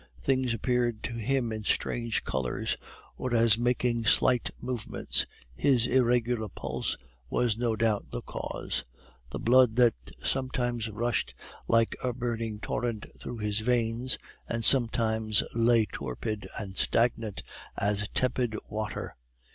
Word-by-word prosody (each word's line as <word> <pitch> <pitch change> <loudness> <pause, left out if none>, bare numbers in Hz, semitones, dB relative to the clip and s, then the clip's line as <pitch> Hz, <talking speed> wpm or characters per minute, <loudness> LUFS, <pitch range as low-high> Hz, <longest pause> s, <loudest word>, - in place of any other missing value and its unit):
Things 130 -2 +1
appeared 120 -1 0
to 120 - -3
him 120 +1 0
in 110 -1 -4
strange 115 +2 0
colors, 65 -2 -1 0.4
or 125 -2 -1
as 115 -1 +5
making 120 -1 +1
slight 125 +1 +4
movements; 125 -3 -2 0.3
his 120 - +3
irregular 120 -3 +2
pulse - - -3 0.3
was 120 -3 +2
no 115 -1 0
doubt 110 -2 0
the - - -5
cause; - - -4 0.5
the - - -4
blood 125 -1 +5
that 120 -1 +6 0.3
sometimes 120 -3 -1
rushed 115 +3 -1 0.3
like 115 0 +3
a 125 -1 0
burning 115 -3 -3
torrent 115 -1 -2
through 120 - -6
his 105 -1 0
veins, 120 +2 0 0.3
and 115 -1 -1
sometimes 110 -4 +3
lay 115 -1 +4
torpid 100 - -4
and 95 -3 -6
stagnant 115 -3 +1 0.3
as 105 0 0
tepid 125 -3 +1
water. 105 0 -4
115 Hz, 125 wpm, -29 LUFS, 110-125 Hz, 0.5 s, that